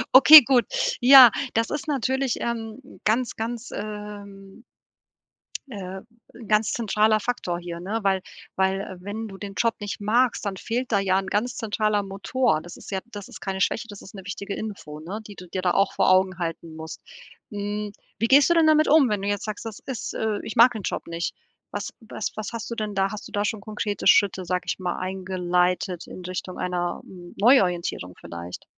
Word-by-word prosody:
Okay, 300 Hz, +4 st, +12 dB
gut. 245 Hz, -3 st, +3 dB, 0.4 s
Ja, 255 Hz, -1 st, +10 dB, 0.2 s
das 230 Hz, 0 st, +1 dB
ist 295 Hz, 0 st, -4 dB
natürlich, 265 Hz, -2 st, 0 dB
ähm, 235 Hz, +3 st, -5 dB
ganz, 230 Hz, +3 st, +1 dB
ganz, 230 Hz, +2 st, -5 dB
ähm 205 Hz, 0 st, -8 dB, 1.0 s
äh, 190 Hz, -5 st, -7 dB, 0.3 s
'n 235 Hz, -2 st, -12 dB
ganz 215 Hz, 0 st, +2 dB
zentraler 215 Hz, -1 st, +2 dB
Faktor 210 Hz, -7 st, -3 dB
hier, 170 Hz, -1 st, -7 dB
ne? 205 Hz, +6 st, -3 dB
Weil 190 Hz, -1 st, +2 dB, 0.3 s
weil 190 Hz, 0 st, -1 dB
wenn 210 Hz, +4 st, -5 dB
du 195 Hz, -2 st, -10 dB
den 200 Hz, -1 st, -7 dB
Job 230 Hz, -1 st, +1 dB
nicht 205 Hz, -1 st, -5 dB
magst, 230 Hz, +3 st, +1 dB
dann 195 Hz, -2 st, -3 dB
fehlt 240 Hz, +6 st, -3 dB
da 200 Hz, -, +3 dB
ja 190 Hz, -1 st, +2 dB
'n 195 Hz, -, -6 dB
ganz 235 Hz, +6 st, -1 dB
zentraler 215 Hz, -1 st, 0 dB
Motor. 195 Hz, -2 st, 0 dB
Das 175 Hz, -, -11 dB
ist -, -, -11 dB
ja 190 Hz, -, -1 dB
das 205 Hz, -1 st, -8 dB
ist -, -, -11 dB
keine 190 Hz, -1 st, -3 dB
Schwäche, 230 Hz, -, 0 dB
das 205 Hz, -1 st, -10 dB
ist 190 Hz, -, -13 dB
'ne 195 Hz, -, -9 dB
wichtige 200 Hz, 0 st, -5 dB
Info, 195 Hz, -9 st, -7 dB
ne, 185 Hz, +7 st, -6 dB
die 205 Hz, -, -11 dB
du 180 Hz, -, -11 dB
dir 185 Hz, +2 st, -4 dB
da 180 Hz, -, +2 dB
auch 195 Hz, +2 st, +2 dB
vor -, -, +2 dB
Augen 185 Hz, 0 st, +3 dB
halten 165 Hz, -1 st, -5 dB
musst. 160 Hz, 0 st, -8 dB, 0.5 s
Hm, 205 Hz, 0 st, -4 dB, 0.3 s
wie 230 Hz, -, +1 dB
gehst 280 Hz, +5 st, +6 dB
du -, -, +5 dB
denn 330 Hz, -2 st, +4 dB
damit 310 Hz, 0 st, +5 dB
wenn 260 Hz, -10 st, +4 dB
du 200 Hz, -, -3 dB
jetzt 205 Hz, -1 st, -2 dB
sagst: 215 Hz, +1 st, -6 dB
„Das 220 Hz, -3 st, -7 dB
ist 255 Hz, -3 st, -5 dB
äh, 220 Hz, -2 st, -1 dB
ich 220 Hz, -, -6 dB
mag 235 Hz, +2 st, +7 dB
den 220 Hz, -3 st, -6 dB
Job -, -, -3 dB
nicht?“ 170 Hz, 0 st, -3 dB, 0.4 s
Was -, -, -4 dB
was 220 Hz, -2 st, -5 dB
was 215 Hz, -2 st, -5 dB
hast 230 Hz, 0 st, -6 dB
du -, -, -2 dB
denn 215 Hz, -2 st, -4 dB
da 195 Hz, +1 st, +1 dB
Hast 215 Hz, -, -7 dB
du -, -, -15 dB
da 205 Hz, 0 st, 0 dB
schon 215 Hz, -1 st, -2 dB
konkrete 210 Hz, -1 st, -3 dB
Schritte, 190 Hz, -2 st, +4 dB
sage 180 Hz, +1 st, -1 dB
ich -, -, -2 dB
mal, 180 Hz, -1 st, -3 dB
eingeleitet 180 Hz, -1 st, -1 dB
in -, -, -9 dB
Richtung 185 Hz, 0 st, -5 dB
einer, 175 Hz, -1 st, -2 dB
hm, 175 Hz, -2 st, -13 dB
Neuorientierung 180 Hz, -, +2 dB
vielleicht? 85 Hz, +1 st, -8 dB
205 Hz, 200 wpm, -24 LUFS, 185-225 Hz, 1.0 s, Okay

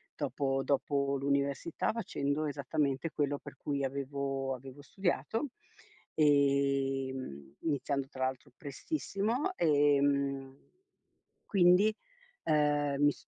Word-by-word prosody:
dopo 135 Hz, -2 st, -1 dB
dopo 140 Hz, 0 st, +1 dB
l'università, 140 Hz, +3 st, 0 dB
facendo 155 Hz, -9 st, -1 dB
esattamente 140 Hz, +1 st, -1 dB
quello 145 Hz, -1 st, 0 dB
per -, -, -11 dB
cui 140 Hz, -1 st, -2 dB
avevo 135 Hz, 0 st, -2 dB
avevo 135 Hz, +2 st, -11 dB
studiato, 200 Hz, -, -1 dB, 0.7 s
ehm, 135 Hz, -, +1 dB
iniziando, 140 Hz, -3 st, -1 dB
tra 130 Hz, 0 st, -2 dB
l'altro, 130 Hz, -1 st, -4 dB
prestissimo; 230 Hz, -, -2 dB
ehm, 140 Hz, -3 st, +2 dB, 0.9 s
quindi, 195 Hz, +3 st, +5 dB, 0.5 s
ehm, 145 Hz, -2 st, +2 dB
mi 145 Hz, 0 st, +6 dB
s -, -, -18 dB
140 Hz, 95 wpm, -32 LUFS, 135-150 Hz, 0.9 s, mi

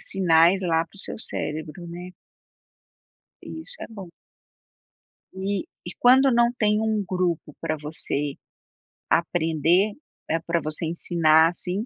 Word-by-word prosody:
sinais 175 Hz, 0 st, +4 dB
lá 165 Hz, -2 st, +1 dB
para 185 Hz, -, -22 dB
o -, -, -9 dB
seu -, -, -4 dB
cérebro, 155 Hz, +1 st, -5 dB
né. 175 Hz, +2 st, -8 dB, 1.3 s
E 320 Hz, -, -7 dB
isso 485 Hz, +9 st, -6 dB
é -, -, -6 dB
bom. 195 Hz, -6 st, -10 dB, 1.2 s
E 195 Hz, 0 st, -2 dB, 0.2 s
e 175 Hz, -, -3 dB
quando 260 Hz, +2 st, +6 dB
não 235 Hz, 0 st, +4 dB
tem 210 Hz, -3 st, +1 dB
um 220 Hz, -2 st, 0 dB
grupo 180 Hz, -5 st, -2 dB
para 155 Hz, -, -2 dB
você 150 Hz, -1 st, -4 dB, 0.7 s
aprender, 170 Hz, +3 st, +2 dB, 0.4 s
eh, 165 Hz, -, +1 dB
para 170 Hz, 0 st, +1 dB
você 155 Hz, +2 st, -4 dB
ensinar, 160 Hz, -1 st, +3 dB
assim, 180 Hz, +4 st, -4 dB
175 Hz, 130 wpm, -24 LUFS, 160-200 Hz, 1.3 s, quando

